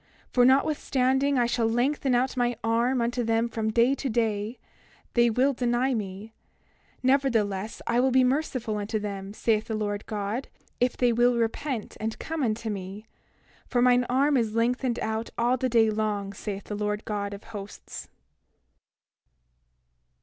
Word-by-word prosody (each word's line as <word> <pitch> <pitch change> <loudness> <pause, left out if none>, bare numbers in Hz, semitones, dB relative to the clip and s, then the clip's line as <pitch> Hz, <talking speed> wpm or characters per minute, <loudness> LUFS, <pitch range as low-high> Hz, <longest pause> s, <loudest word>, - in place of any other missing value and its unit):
For 245 -1 +5
notwithstanding 270 0 +2
I 245 - +3
shall 235 -1 +1
lengthen 255 +2 +1
out 255 +2 +1
mine 245 -1 +1
arm 235 +3 +2
unto 240 +1 -1
them 225 +1 +1
from 225 -1 -2
day 235 +4 +3
to 275 -1 -3
day, 220 0 -1 0.6
they 235 -1 +4
will 260 +5 +2
deny 245 +1 +1
me; 205 0 -5 0.7
nevertheless, 225 -7 +1
I 235 +1 +1
will 260 +1 +3
be 260 0 +4
merciful 255 -5 0
unto 210 +2 -2
them, 200 -2 -5
saith 215 0 0
the 225 - -3
Lord 205 -1 -3
God, 215 +4 -3 0.3
if 245 0 +1
they 245 -1 +3
will 240 +1 +3
repent 235 +1 -2
and 220 0 -3
come 320 -1 -4
unto 225 -2 -1
me; 195 +2 -6 0.6
for 245 - 0
mine 245 0 +4
arm 275 +3 +3
is 225 -3 0
lengthened 245 +1 +1
out 220 +1 -2
all 240 +2 +2
the 255 0 -1
day 225 -2 +4
long, 210 -2 -2
saith 200 0 -5
the 210 - -5
Lord 210 0 -2
God 205 -1 -3
of 200 - -12
Hosts. 200 -1 -8
235 Hz, 155 wpm, -27 LUFS, 215-255 Hz, 0.7 s, For